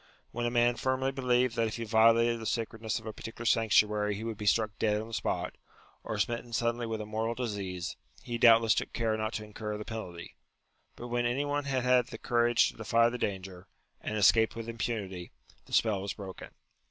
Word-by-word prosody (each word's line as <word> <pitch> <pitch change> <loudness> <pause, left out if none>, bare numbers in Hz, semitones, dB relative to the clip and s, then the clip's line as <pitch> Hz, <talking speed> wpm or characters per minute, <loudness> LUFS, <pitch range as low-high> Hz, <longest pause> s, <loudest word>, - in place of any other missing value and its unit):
When 120 0 -2
a - - +1
man 120 0 +2
firmly 130 0 0
believed 125 -2 +1
that 115 -1 +2
if 110 - -4
he 115 - -4
violated 115 +1 +4
the 110 - -5
sacred 115 -1 -3
ness 110 -2 -1
of 115 - -9
a 110 - -5
particular 115 +2 -8
sanctuary 105 -2 +3
he 105 - -6
would 115 -1 -3
be 105 0 -5
struck 110 +1 +3
dead 105 -1 +2
on 110 +1 -7
the - - -11
spot, - - -2 0.5
or - - -4
smitten 120 0 -2
suddenly 120 +1 0
with 110 -1 -3
a - - -5
mortal 110 +2 -2
disease, 100 -7 -4 0.3
he 120 -1 -4
doubtless 115 -1 +6
took - - -3
care 115 -2 0
not 110 +1 -2
to 110 - -3
incur 105 0 -5
the 105 - -7
penalty: 90 -7 -7 0.6
but 120 - -8
when 120 0 +1
any 130 +4 0
one 145 0 -1
had 130 -3 0
had 125 -1 +3
the - - -8
courage 120 -1 +3
to - - -13
defy 115 +1 +3
the 125 +1 -5
danger, 95 -2 -4 0.3
and 110 - -3
escaped 110 +2 +4
with 115 0 -6
impunity, 105 -6 -4 0.4
the - - -17
spell 105 -4 +2
was 100 0 -3
broken. 95 -3 -9
115 Hz, 215 wpm, -30 LUFS, 105-120 Hz, 0.6 s, doubtless